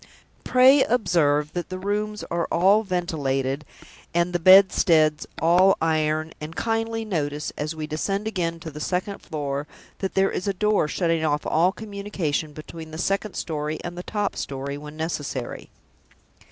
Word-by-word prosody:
Pray 260 +2 +6
observe 150 -10 +1
that 175 -1 -4
the 185 - -4
rooms 210 +2 -2
are 170 -1 0
all 195 +5 +4
ventilated, 145 -8 -1 0.5
and 170 +1 +1
the 175 - +1
bedsteads 165 -4 +5
all 180 +4 +5
iron 155 0 0
and 155 +2 -7
kindly 225 0 -1
notice, 150 -7 -2
as 150 +2 -3
we 155 -1 -4
descend 195 +8 -2
again 170 -6 -2
to 160 -1 -7
the 150 - -8
second 185 +5 -2
floor, 145 -1 -4 0.3
that 190 - -3
there 195 0 +3
is 180 - -3
a 200 - 0
door 210 -4 +2
shutting 165 0 0
off 150 -1 0
all 170 +4 +3
communication 200 -8 -3
between 160 +2 -9
the 155 - -8
second 195 +3 -1
story 155 -1 -3
and 175 0 -5
the 175 - -5
top 205 +2 -2
story 140 +1 -4
when 150 +1 -9
necessary. 145 -6 -4
170 Hz, 155 wpm, -24 LUFS, 150-195 Hz, 0.5 s, Pray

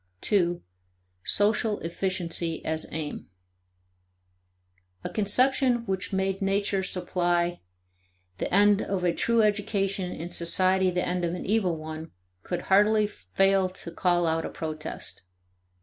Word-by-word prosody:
2. 175 -4 +1 0.6
Social 210 +1 +2
Efficiency 170 -1 -2
as 160 0 -1
Aim. 155 -1 -5 1.8
A - - -4
conception 245 +3 +2
which 190 0 -3
made 190 0 -1
nature 195 0 +1
supply 175 -2 0 0.8
the - - -2
end 205 +1 +5
of 195 -2 -2
a 175 -1 +2
true 230 -1 +2
education 200 -3 0
and 170 +2 -6
society 185 +2 +3
the 180 0 -1
end 180 0 -1
of 170 0 -1
an - - -6
evil 190 -5 +1
one, 155 +1 -7 0.3
could 175 - -4
hardly 210 +2 +4
fail 195 - +1
to 180 -2 -9
call 175 0 +1
out 165 0 0
a - - -4
protest. 155 -1 -6
185 Hz, 125 wpm, -27 LUFS, 175-205 Hz, 1.8 s, end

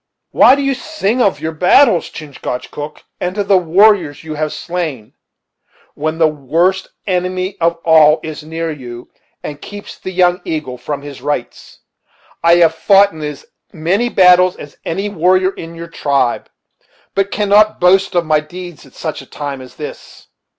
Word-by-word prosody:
"Why 260 - +6
do 280 - -2
you 275 0 +1
sing 255 -4 -2
of 190 -10 +2
your 160 +1 -3
battles, 180 - +4
Chingachgook, 145 0 -7 0.2
and 180 +3 -3
of 200 -1 -1
the 195 -2 +5
warriors 175 -4 +3
you 160 -1 -6
have 155 0 -2
slain, 160 -11 -5 0.8
when 155 +2 -3
the 160 -1 +4
worst 165 +6 0 0.2
enemy 185 0 -2
of 170 0 +2
all 160 -1 +6
is 155 -1 -6
near 160 +1 -4
you, 120 -5 -9 0.3
and 145 -1 -7
keeps 205 0 -10
the - - -6
Young 180 0 +2
Eagle 140 -6 -4
from 140 +3 -5
his 140 -3 -9
rights? 135 -3 -5 0.6
I 170 0 +6
have 165 -2 +4
fought 200 +5 +4
in 160 - -10
as 150 -2 -6 0.3
many 190 +8 0
battles 180 -2 +5
as 145 - -11
any 195 +5 -2
warrior 185 0 +2
in 165 -3 -10
your 170 0 -8
tribe, 140 -6 -1 0.6
but 195 0 0
cannot 210 +1 +3
boast 190 +1 +3
of 175 -1 +2
my 155 -1 +3
deeds 175 0 -10
at 130 - -21
such 155 -2 -5
a - - -15
time 140 -2 -6
as 130 - -13
this." 150 - -10
165 Hz, 165 wpm, -16 LUFS, 150-185 Hz, 0.8 s, Why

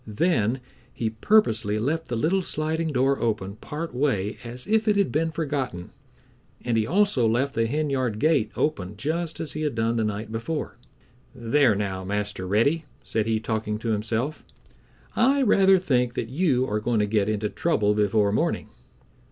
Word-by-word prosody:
Then 115 - +1 0.3
he 110 -2 -2
purposely 110 - +2
left 155 +9 -1
the 120 - -3
little 165 +11 +1
sliding 160 -1 -1
door 135 -1 +1
open 105 -3 -2
part 160 +5 -6
way 125 -7 -1
as 120 +1 -5
if 220 +1 +1
it 210 - +4
had 200 -2 +2
been 165 +2 +1
forgotten, 140 - -3 0.7
and 120 -2 +1
he 110 -1 +1
also 185 - +3
left 130 +5 +1
the 115 0 +1
henyard 135 -5 -1
gate 145 -4 +2
open 100 -10 -2
just 160 +7 -3
as 155 -3 -4
he 155 - -5
had 150 -5 -1
done 115 +1 0
the 110 - +1
night 105 +1 -3
before. 120 +4 -4 0.6
"There 120 0 +3
now, 95 -2 -3
Master 100 -1 -3
Reddy," 140 - +2 0.2
said 110 0 -1
he, 110 -1 +1
talking 110 -1 -2
to 115 +1 -4
himself, 110 +7 -2 0.7
"I 270 +4 +3
rather 195 -4 +5
think 125 -9 0
that 115 - -3
you 130 -3 +1
are 105 +1 -1
going 115 +2 0
to 105 - +3
get 105 -1 +1
into 105 0 -1
trouble 105 -11 +1
before 105 0 +2
morning." 105 - -1
120 Hz, 170 wpm, -25 LUFS, 105-155 Hz, 0.7 s, rather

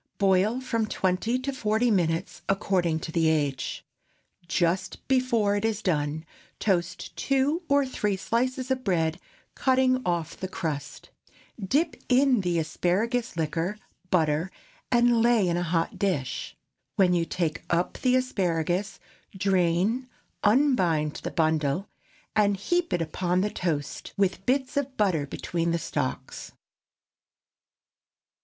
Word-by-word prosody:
Boil 200 +4 +3
from 230 -4 -1
twenty 190 +6 0
to 270 +2 -3
forty 225 -1 +1
minutes, 170 -2 0
according 185 -5 +1
to 160 - -5
the 165 -1 +2
age. 145 -4 -1 0.6
Just 180 +3 -1
before 240 -6 +2
it 205 - -1
is 220 -1 -1
done, 155 -2 -1 0.3
toast 185 -2 -1
two 275 +5 +1
or 280 0 +4
three 210 -6 -1
slices 255 +5 -1
of 260 -1 0
bread, 165 -4 0 0.3
cutting 255 -1 +2
off 170 -2 -1
the 190 - -5
crust; 150 -5 -5 0.5
dip 300 - +1
in 255 -2 +4
the 175 -2 0
asparagus 190 +8 0
liquor, 165 +5 -1 0.3
butter, 160 -1 +2 0.4
and 240 -1 +4
lay 230 -4 +4
in 170 - +1
a 175 - 0
hot 165 -1 -1
dish. 170 -10 -2 0.4
When 185 -2 +4
you 170 -1 +2
take 165 -1 -2
up 175 +1 0
the 255 -1 +3
asparagus, 185 -5 0 0.4
drain, 190 +6 +1 0.3
unbind 195 - +3
the - - -3
bundle, 160 +2 0 0.5
and 205 -2 +3
heap 350 - 0
it 175 - +1
upon 180 +3 0
the 210 +1 0
toast, 155 -5 -3
with 195 -1 0
bits 265 +1 +1
of 275 -2 -2
butter 175 -9 +1
between 170 +4 -2
the 170 - +1
stalks. 130 -5 -4
190 Hz, 130 wpm, -27 LUFS, 165-240 Hz, 0.6 s, or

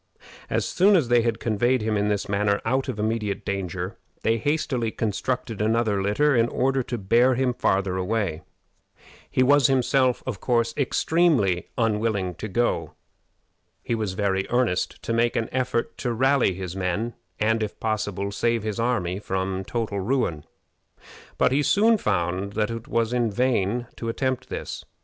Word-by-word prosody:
As - - 0
soon 195 +3 +4
as 150 -10 +2
they 120 -1 +5
had 115 -1 -1
conveyed 120 +2 +1
him 110 0 0
in 105 0 +1
this 105 -1 -1
manner 100 0 +1
out 130 +4 0
of 125 - -3
immediate 105 -2 -2
danger, 95 -1 -4 0.2
they 115 +1 +2
hastily 145 -3 0
constructed 110 +1 -2
another 110 -2 +1
litter 125 +9 +2
in 115 -1 +3
order 135 +2 +1
to 120 0 -4
bear 120 +6 +3
him 130 0 +1
farther 95 -4 0
away. 95 -4 -1 0.9
He 130 - +2
was 140 0 +5
himself 130 -1 +2 0.5
extremely 140 - +2
unwilling 105 -5 0
to 105 - -6
go. 100 -7 -1 0.9
He - - -2
was 110 -4 -1
very 95 0 0
earnest 120 -7 0
to 115 - -2
make 115 +1 +2
an 115 - -1
effort 125 -2 -1
to 125 - -1
rally 130 -4 +2
his 90 -1 -6
men, 95 +5 -2 0.3
and, 110 +1 +2
if 105 -1 -4
possible, 105 -3 -2
save 115 +2 0
his 110 -1 -3
army 100 -6 0
from 95 -1 -2
total 110 -1 -3
ruin. 95 - -1 0.9
But - - +3
he 140 +3 +3
soon 215 +8 +4
found 95 - -1
that 105 +1 0
it 115 0 -6
was 115 0 0
in 120 -2 +1
vain 120 0 0
to 115 - -4
attempt 130 +2 -2
this. - - -5
115 Hz, 160 wpm, -24 LUFS, 100-125 Hz, 0.9 s, they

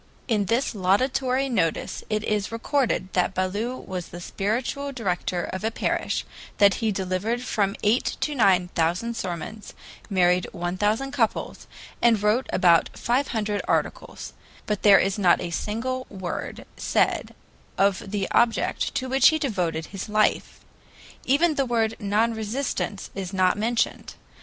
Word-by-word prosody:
In 215 -5 +1
this 235 +7 0
laudatory 255 +7 +1
notice 185 -11 -1
it 215 0 -1
is 210 -2 -1
recorded 230 -4 -1
that 185 +1 +1
Ballou 205 +7 -1
was 180 -2 -6
the 175 - -9
spiritual 240 +10 -2
director 180 -7 -2
of 190 +1 -5
a 220 - +1
parish, - - -1 0.3
that 200 -1 +6
he 220 -1 +1
delivered 195 +5 -2
from 200 -5 0
eight 220 +5 +1
to 300 - 0
nine 190 -8 +3
thousand 180 +8 0
sermons, 195 +1 -6 0.3
married 180 -2 +3
one 175 +1 -3
thousand 215 +8 0
couples, 240 -6 -1 0.3
and 225 -3 +4
wrote 220 +5 +2
about 175 -2 +4
five 260 +3 +1
hundred 210 -3 -1
articles; - - -2 0.3
but 210 -2 -2
there 200 -2 +8
is 195 +2 +1
not 180 -3 +4
a 170 - -4
single 255 +8 -3
word 190 -3 -5
said - - 0 0.4
of 195 0 +1
the 200 -1 -1
object 235 +3 +1
to 260 -2 -1
which 265 +1 +5
he 315 - +4
devoted 180 - -1
his 195 +2 -5
life; 215 0 +1 0.6
even 310 +5 +3
the 275 -2 0
word 225 -2 +1
"non 215 +2 +1
resistance" 220 -2 -3
is 190 -1 -5
not 185 -1 +3
mentioned. 225 +3 -1
210 Hz, 145 wpm, -25 LUFS, 185-240 Hz, 0.6 s, there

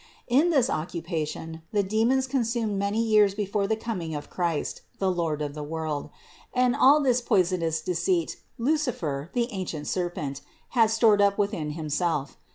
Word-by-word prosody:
In 280 +8 +4
this 275 -7 +3
occupation 160 - -4
the 205 -2 +2
demons 225 +7 +2
consumed 230 -5 -1
many 200 +2 0
years 215 -3 +4
before 200 -1 -1
the 220 - +1
coming 195 -8 -4
of 145 - -7
Christ, 170 -4 -2 0.2
the 190 -1 +1
Lord 165 -4 -1
of 145 -1 -4
the 150 - -6
world; 155 -1 -3 0.5
and 250 0 +3
all 285 +2 +6
this 250 -2 +3
poisonous 180 -7 +1
deceit 170 -1 0 0.2
Lucifer, 230 - -1
the 240 -1 +1
ancient 175 -6 -4
serpent, 155 -6 -3 0.3
had 225 -3 +4
stored 220 -2 +4
up 200 0 +3
within 200 -8 -1
himself. 155 -2 -1
195 Hz, 155 wpm, -26 LUFS, 160-230 Hz, 0.5 s, all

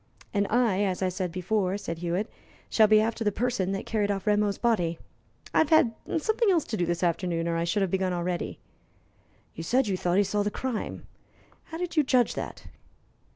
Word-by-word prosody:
"And 200 -1 +1
I, 225 -4 +2
as 190 -1 -1
I 185 - +2
said 180 -1 -3
before," 185 +2 0
said 170 -5 -5
Hewitt, 175 +5 -1 0.4
"shall 220 -1 +5
be 215 0 +6
after 225 +1 0
the 210 - +2
person 215 -4 -1
that 195 - -4
carried 210 -2 0
off 195 -2 -2
Rameau's 210 -1 +2
body. 175 -9 +1 0.6
I - - +4
have 315 - +3
had 290 -8 +5 0.2
something 440 +7 +1
else 340 -5 +3
to - - -4
do 175 - 0
this 175 +1 -1
afternoon, 170 -1 0
or 170 - 0
I 165 0 0
should 195 +4 +1
have 190 - -1
begun 190 -1 0
already." 175 0 -2 1.0
"You - - -7
said 250 +10 +2
you 200 -3 0
thought 180 0 0
he 205 - +5
saw 205 +1 0
the 205 - 0
crime. 245 +1 -4 0.6
How 325 - -7
did 350 -1 -4
you - - +7
judge 255 -3 +2
that?" - - -6
205 Hz, 205 wpm, -27 LUFS, 180-230 Hz, 1.0 s, you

